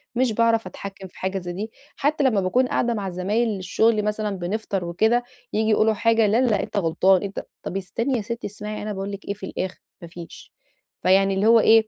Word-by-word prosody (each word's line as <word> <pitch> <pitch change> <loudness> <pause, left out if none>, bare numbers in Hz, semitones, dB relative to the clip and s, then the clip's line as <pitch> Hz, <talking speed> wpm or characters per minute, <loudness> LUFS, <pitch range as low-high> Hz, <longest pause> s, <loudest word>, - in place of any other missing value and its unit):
مش 250 -1 +2
باعرف 230 0 +2
أتحكم 195 -1 -8
في 180 - -17
حاجة 190 +1 -1
زي 175 -1 -6
دي، 215 +4 -5 0.2
حتى 290 +1 +1
لما 230 -7 +3
باكون 245 +8 +2
قاعدة 240 -1 +1
مع 200 -3 -3
زمايل 205 +6 0
للشغل 210 +2 +1
مثلًا، 210 0 -1
بنفطر 195 0 -2
وكده، 220 +8 +2 0.3
ييجي 220 +1 +1
يقولوا 220 0 +4
حاجة، 225 0 +3
لا 220 +4 +3
لا 235 -5 +2
أنت - - -5
غلطان، 185 +1 +3
أنت 200 -1 -5 0.2
طَب 190 - -3
استني 230 +7 -1
يا 220 - -2
ستي، 235 +3 -4
اسمعي 210 +1 -6
أنا 210 0 -3
باقول 195 +1 -4
لِك 200 0 -8
إيه 200 - -2
في 200 -1 -8
الآخر، 185 0 -4 0.2
ما 170 - -8
فيش، 170 0 -11 0.5
فيعني 195 +1 +4
اللي 190 +2 +1
هو 230 0 +7
إيه، 220 0 +5
210 Hz, 210 wpm, -23 LUFS, 190-225 Hz, 0.5 s, هو